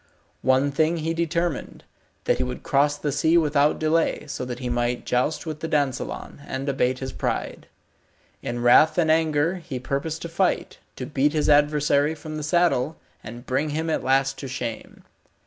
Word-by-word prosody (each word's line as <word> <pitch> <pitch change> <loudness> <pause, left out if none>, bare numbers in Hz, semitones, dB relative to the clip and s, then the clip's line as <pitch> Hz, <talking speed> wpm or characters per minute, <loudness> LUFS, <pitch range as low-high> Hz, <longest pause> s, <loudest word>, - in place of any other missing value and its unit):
One 130 +2 +3
thing 155 +4 +1
he 165 +1 -2
determined, 170 -1 -2 0.4
that - - +1
he - - +1
would 65 +1 -5
cross 145 +1 +2
the 145 0 -2
sea 160 +4 +3
without 150 -2 +3
delay, 160 +1 +1
so 140 -3 -5
that 125 -1 -5
he 125 0 -5
might 120 0 -1
joust 145 +6 0
with 155 -2 -5
the 160 - -4
dansellon, 145 -1 -2
and 135 +1 -4
abate 130 -2 +1
his 130 0 -5
pride. - - -3 0.7
In 120 0 -4
wrath 155 +6 +6
and 160 -3 +3
anger 160 +2 +2
he 160 -7 -6
purposed 140 +5 -3
to - - -4
fight, 180 +2 -1 0.2
to 130 - -5
beat 145 +2 +1
his 155 -2 +1
adversary 150 0 +3
from 155 0 -8
the - - -4
saddle, 160 -2 +1 0.3
and 120 +2 -9
bring 140 +4 0
him 160 +2 -2
at - - -1
last 135 0 +1
to 135 - -6
shame. 120 -3 -6
145 Hz, 180 wpm, -24 LUFS, 130-160 Hz, 0.7 s, wrath